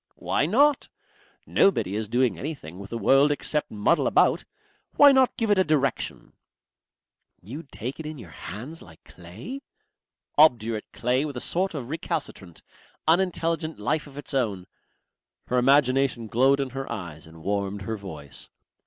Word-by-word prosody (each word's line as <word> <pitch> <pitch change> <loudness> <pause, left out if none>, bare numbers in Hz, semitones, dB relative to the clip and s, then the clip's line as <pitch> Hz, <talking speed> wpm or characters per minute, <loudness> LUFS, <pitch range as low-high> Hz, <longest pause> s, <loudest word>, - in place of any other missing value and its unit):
"Why 145 - 0
not? 280 - +3 0.6
Nobody 105 - +2
is 110 0 -2
doing 125 +2 +1
anything 135 - -7
with 100 0 -9
the 115 - -4
world 135 +6 +4
except 150 +1 -2
muddle 105 +11 +1
about. - - +3 0.5
Why 285 -1 +8
not 265 -2 +3
give 225 -4 0
it 200 - +4
a - - +5
direction?" 150 -4 -1 1.1
"You'd 135 - -10
take 125 +7 -6
it 160 - -5
in 155 0 -7
your 100 - -11
hands 110 - -8
like 80 -2 -16
clay?" 105 - -9 0.8
"Obdurate 115 -7 +3
clay 125 +3 0
with 145 -4 -5
a - - -2
sort 180 +6 -1
of 130 -4 -5
recalcitrant, 140 - -5 0.4
unintelligent 165 -2 +1
life 150 +9 -1
of 140 0 -13
its 145 - -8
own." 105 -9 -1 0.8
Her 125 - +1
imagination 135 -2 +3
glowed 130 +5 +3
in 135 -2 -2
her 135 0 -5
eyes 85 -8 -7
and 80 0 -14
warmed 100 +1 -2
her 110 +3 -3
voice. 80 -9 -9
130 Hz, 155 wpm, -25 LUFS, 105-155 Hz, 1.1 s, Why